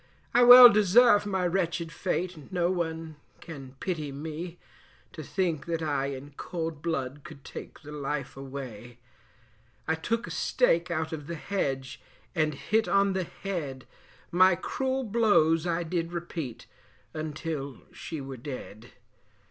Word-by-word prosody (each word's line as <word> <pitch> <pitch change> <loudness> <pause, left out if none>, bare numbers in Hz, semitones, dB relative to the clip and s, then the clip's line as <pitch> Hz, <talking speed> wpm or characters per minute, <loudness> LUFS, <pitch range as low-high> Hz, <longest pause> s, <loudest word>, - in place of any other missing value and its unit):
I 245 - +5
well 245 0 +12
deserve 210 0 +5
my 190 -2 0
wretched 175 -2 -1
fate, 180 -3 -3
no 175 -1 +1
one 160 -3 -3 0.2
can 135 -5 -10
pity 155 -6 -3
me, 160 +4 -6 0.6
To - - -7
think 170 -6 -2
that 165 -1 -2
I 140 -3 0
in 140 +1 -7
cold 165 -4 -4
blood 145 -4 -3
could 135 - -12
take - - -9
the 150 - -10
life 145 -2 -4
away; 130 -4 -8 0.9
I 160 - +2
took 230 +9 -2
a - - -8
stake 180 -9 +2
out 160 -1 -2
of 150 -2 -6
the 170 - -4
hedge 135 -7 -3 0.3
and 155 -4 +1
hit 220 +9 0
on 200 0 +3
the 185 -1 -1
head, 155 -10 -5 0.5
My 185 +1 +6
cruel 265 +8 -2
blows 200 -8 +3
I 170 0 0
did 170 0 -3
repeat 165 -7 -5 0.5
until 155 -3 -5
she 160 - -6
were 135 -1 -7
dead. 120 -3 -8
165 Hz, 140 wpm, -28 LUFS, 145-185 Hz, 0.9 s, well